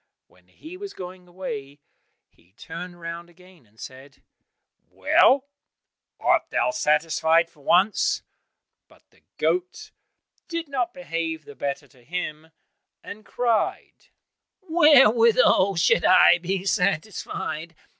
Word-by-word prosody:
When -, -, -28 dB
he 325 Hz, +4 st, -12 dB
was 400 Hz, 0 st, -9 dB
going 180 Hz, 0 st, -10 dB
away, 145 Hz, -6 st, -8 dB, 0.5 s
he 90 Hz, +3 st, -31 dB
turned 175 Hz, -, -9 dB
round 170 Hz, +1 st, -8 dB
again 175 Hz, -6 st, -21 dB
and 110 Hz, +2 st, -28 dB
said, 135 Hz, +2 st, -12 dB, 0.7 s
"Well, 270 Hz, +1 st, +3 dB, 0.7 s
art -, -, +2 dB
thou -, -, 0 dB
satisfied 165 Hz, -, +1 dB
for 150 Hz, -, -25 dB
once?" 190 Hz, +8 st, +2 dB, 0.6 s
But -, -, -24 dB
the -, -, -28 dB, 0.2 s
goat 365 Hz, +1 st, -2 dB, 0.6 s
did 335 Hz, -1 st, -5 dB
not 255 Hz, -4 st, -2 dB
behave 165 Hz, -, -4 dB
the 145 Hz, -, -12 dB
better 140 Hz, 0 st, -5 dB
to 130 Hz, -4 st, -24 dB
him, 160 Hz, 0 st, -5 dB, 0.6 s
and 215 Hz, -, -10 dB
cried, 235 Hz, -1 st, -2 dB, 0.5 s
"Wherewithal 245 Hz, -, +4 dB
should 170 Hz, 0 st, +2 dB
I 185 Hz, -1 st, +6 dB
be 185 Hz, +2 st, -3 dB
satisfied? 180 Hz, -4 st, -2 dB
180 Hz, 115 wpm, -24 LUFS, 160-230 Hz, 0.7 s, I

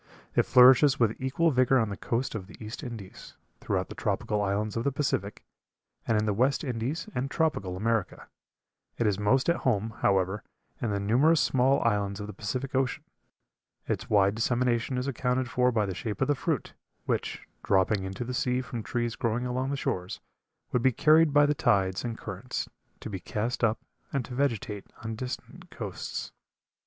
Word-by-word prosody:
It -, -, +3 dB
flourishes 130 Hz, +2 st, +7 dB
with 115 Hz, -2 st, +3 dB
equal 140 Hz, +6 st, +2 dB
vigor 130 Hz, 0 st, +4 dB
on 115 Hz, -4 st, +1 dB
the 100 Hz, -, -4 dB
coast 120 Hz, +6 st, -2 dB
of 100 Hz, -4 st, -5 dB
the -, -, -12 dB
East 110 Hz, +1 st, -7 dB
Indies, 115 Hz, -8 st, -9 dB, 0.2 s
throughout -, -, -1 dB
the -, -, -8 dB
tropical 105 Hz, -1 st, -1 dB
islands 105 Hz, +1 st, -1 dB
of 115 Hz, -, -1 dB
the 140 Hz, -, +1 dB
Pacific, 125 Hz, -8 st, -2 dB, 0.6 s
and 115 Hz, -, +3 dB
in 105 Hz, -, +1 dB
the 105 Hz, -, +1 dB
West 130 Hz, +9 st, +2 dB
Indies 130 Hz, -, -3 dB
and 135 Hz, +2 st, -2 dB
tropical 100 Hz, -, 0 dB
America. 110 Hz, 0 st, -1 dB, 0.7 s
It 115 Hz, -, 0 dB
is 105 Hz, -2 st, +1 dB
most 130 Hz, +6 st, +2 dB
at 170 Hz, -, +3 dB
home, 110 Hz, -3 st, 0 dB
however, 95 Hz, +1 st, +2 dB, 0.4 s
in 120 Hz, -, 0 dB
the 100 Hz, -1 st, -1 dB
numerous 130 Hz, +11 st, +4 dB
small 135 Hz, 0 st, +3 dB
islands 100 Hz, -3 st, 0 dB
of 105 Hz, -, -4 dB
the 105 Hz, -, -7 dB
Pacific 130 Hz, +5 st, -4 dB
Ocean. 130 Hz, -1 st, 0 dB, 0.8 s
Its -, -, -2 dB
wide 100 Hz, -1 st, +4 dB
dissemination 120 Hz, +2 st, 0 dB
is 125 Hz, +2 st, -2 dB
accounted 130 Hz, -1 st, 0 dB
for 125 Hz, 0 st, +2 dB
by 110 Hz, -3 st, +1 dB
the 95 Hz, -, -3 dB
shape 105 Hz, +3 st, -4 dB
of 135 Hz, -, +2 dB
the 145 Hz, -, +3 dB
fruit, 135 Hz, -, -2 dB, 0.3 s
which, -, -, -2 dB
dropping 95 Hz, +1 st, +2 dB
into 95 Hz, +4 st, -4 dB
the 125 Hz, +1 st, -5 dB
sea 125 Hz, 0 st, +1 dB
from 125 Hz, -2 st, -5 dB
trees 120 Hz, +1 st, -2 dB
growing 120 Hz, +1 st, -1 dB
along 130 Hz, +2 st, -1 dB
the 140 Hz, -, -1 dB
shores, 90 Hz, -8 st, -3 dB, 0.5 s
would 125 Hz, -, +1 dB
be 130 Hz, -, +4 dB
carried 155 Hz, +5 st, +5 dB
by 145 Hz, 0 st, +6 dB
the 145 Hz, -, +2 dB
tides 95 Hz, -8 st, +1 dB
and 115 Hz, -2 st, -4 dB
currents 105 Hz, +5 st, -5 dB, 0.3 s
to -, -, -6 dB
be 95 Hz, -, -4 dB
cast 115 Hz, +7 st, -3 dB
up 115 Hz, -1 st, +3 dB, 0.3 s
and 135 Hz, -3 st, -1 dB
to 125 Hz, -, -9 dB
vegetate 115 Hz, -6 st, -1 dB, 0.2 s
on 110 Hz, 0 st, -3 dB
distant 125 Hz, +3 st, -7 dB
coasts. -, -, -5 dB
120 Hz, 185 wpm, -28 LUFS, 105-130 Hz, 0.8 s, flourishes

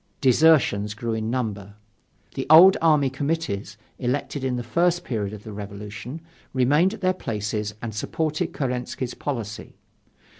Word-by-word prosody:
Desertions 130 Hz, -7 st, +4 dB
grew 115 Hz, +1 st, -3 dB
in 110 Hz, 0 st, -2 dB
number. 105 Hz, -5 st, -3 dB, 0.6 s
The 135 Hz, -, -4 dB
old 175 Hz, +5 st, +9 dB
army 150 Hz, -5 st, +3 dB
committees, 135 Hz, -8 st, -3 dB, 0.2 s
elected 135 Hz, +2 st, -2 dB
in 130 Hz, -1 st, 0 dB
the 120 Hz, -, -3 dB
first 170 Hz, +9 st, +1 dB
period 105 Hz, -5 st, -3 dB
of 105 Hz, -1 st, -9 dB
the 110 Hz, -, -8 dB
Revolution, 105 Hz, +7 st, -7 dB, 0.3 s
remained 145 Hz, -, +3 dB
at 210 Hz, -, -15 dB
their 185 Hz, 0 st, +2 dB
places 105 Hz, -, -3 dB
and 115 Hz, -2 st, -4 dB
supported 155 Hz, +8 st, -2 dB
Kerensky's 125 Hz, -1 st, -3 dB
policy. 115 Hz, -7 st, -5 dB
125 Hz, 140 wpm, -24 LUFS, 105-150 Hz, 0.6 s, old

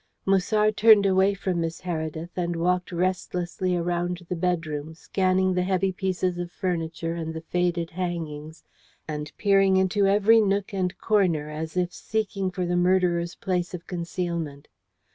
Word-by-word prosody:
Musard 210 Hz, +2 st, +2 dB
turned 215 Hz, -2 st, +7 dB
away 190 Hz, +1 st, +3 dB
from 185 Hz, -3 st, -1 dB
Miss 165 Hz, 0 st, -3 dB
Heredith, 160 Hz, -1 st, -4 dB
and 175 Hz, -1 st, -1 dB
walked 180 Hz, +2 st, 0 dB
restlessly 180 Hz, 0 st, -1 dB
around 175 Hz, +1 st, -2 dB
the 180 Hz, -, -2 dB
bedroom, 160 Hz, -3 st, -2 dB
scanning 185 Hz, +1 st, +1 dB
the 180 Hz, -, +1 dB
heavy 190 Hz, +1 st, +1 dB
pieces 185 Hz, -1 st, -1 dB
of 175 Hz, 0 st, -4 dB
furniture 165 Hz, -3 st, -2 dB
and 160 Hz, -1 st, -4 dB
the 160 Hz, -, -5 dB
faded 175 Hz, 0 st, -1 dB
hangings, 160 Hz, -3 st, -5 dB, 0.4 s
and 150 Hz, -1 st, -5 dB
peering 195 Hz, -2 st, +4 dB
into 190 Hz, +1 st, +2 dB
every 210 Hz, +3 st, +5 dB
nook 200 Hz, -1 st, 0 dB
and 185 Hz, -1 st, -1 dB
corner, 175 Hz, -8 st, +1 dB
as 160 Hz, +3 st, -5 dB
if 180 Hz, -1 st, 0 dB
seeking 200 Hz, -3 st, -2 dB
for 180 Hz, 0 st, -3 dB
the 175 Hz, 0 st, 0 dB
murderer's 175 Hz, -1 st, +2 dB
place 180 Hz, -1 st, -2 dB
of 170 Hz, -, -9 dB
concealment. 170 Hz, -4 st, -4 dB
180 Hz, 150 wpm, -25 LUFS, 170-190 Hz, 0.4 s, turned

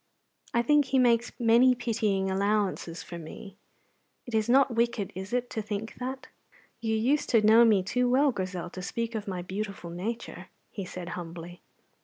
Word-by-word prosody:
I 235 Hz, -, +2 dB
think 295 Hz, +2 st, +4 dB
He 265 Hz, 0 st, 0 dB
makes 240 Hz, -2 st, +3 dB
many 240 Hz, +2 st, +5 dB
pitying 215 Hz, -5 st, 0 dB
allowances 200 Hz, -3 st, -1 dB
for 170 Hz, -, -8 dB
me. 185 Hz, +5 st, -10 dB, 0.7 s
It 245 Hz, -, -9 dB
is 220 Hz, 0 st, +1 dB
not 265 Hz, 0 st, +4 dB
wicked, 230 Hz, -3 st, 0 dB
is 190 Hz, +2 st, -7 dB
it, 250 Hz, 0 st, 0 dB
to 220 Hz, -, -2 dB
think 210 Hz, +1 st, -5 dB
that?" 260 Hz, +1 st, -5 dB, 0.5 s
"You 220 Hz, -1 st, -1 dB
used 260 Hz, +7 st, +1 dB
to 225 Hz, -, +4 dB
know 220 Hz, +2 st, +7 dB
me 210 Hz, -5 st, +4 dB
too 250 Hz, +6 st, 0 dB
well, 275 Hz, +3 st, +4 dB
Grizel, 185 Hz, -4 st, -4 dB
to 185 Hz, -, -7 dB
speak 230 Hz, +5 st, -3 dB
of 215 Hz, -2 st, -4 dB
my 180 Hz, -2 st, -4 dB
beautiful 195 Hz, -2 st, -5 dB
nature," 185 Hz, 0 st, -5 dB, 0.2 s
he 195 Hz, -, -5 dB
said 180 Hz, -1 st, -7 dB
humbly. 170 Hz, 0 st, -8 dB
220 Hz, 175 wpm, -28 LUFS, 190-240 Hz, 0.7 s, know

